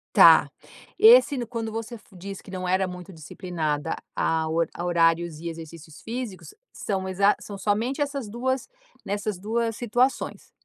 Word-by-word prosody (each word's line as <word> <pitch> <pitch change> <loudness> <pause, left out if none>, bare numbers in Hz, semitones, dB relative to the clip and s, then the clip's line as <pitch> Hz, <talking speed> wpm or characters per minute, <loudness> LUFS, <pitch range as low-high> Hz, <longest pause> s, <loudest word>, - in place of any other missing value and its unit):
Tá. - - +8 0.5
Esse 445 - +7
no 240 -2 -3
quando 225 -2 -4
você 225 +1 -5
diz 195 +1 -8
que 190 - -13
não 185 -1 -4
era 190 +1 +2
muito 180 +1 -9
disciplinada 160 -2 -3 0.2
a 160 -1 +1
hor 165 0 +1
a 175 - -6
horários 170 -2 +2
e 170 - -6
exercícios 165 -1 -9
físicos, 235 - -6 0.2
são 190 -2 -3
exa 200 +2 +3
são 200 -1 -8
somente 220 +8 -1
essas 280 -5 -2
2, 255 +4 -2 0.4
nessas 200 -1 -3
2 225 +2 -1
situações? 245 +3 -1
195 Hz, 150 wpm, -25 LUFS, 170-230 Hz, 0.5 s, Tá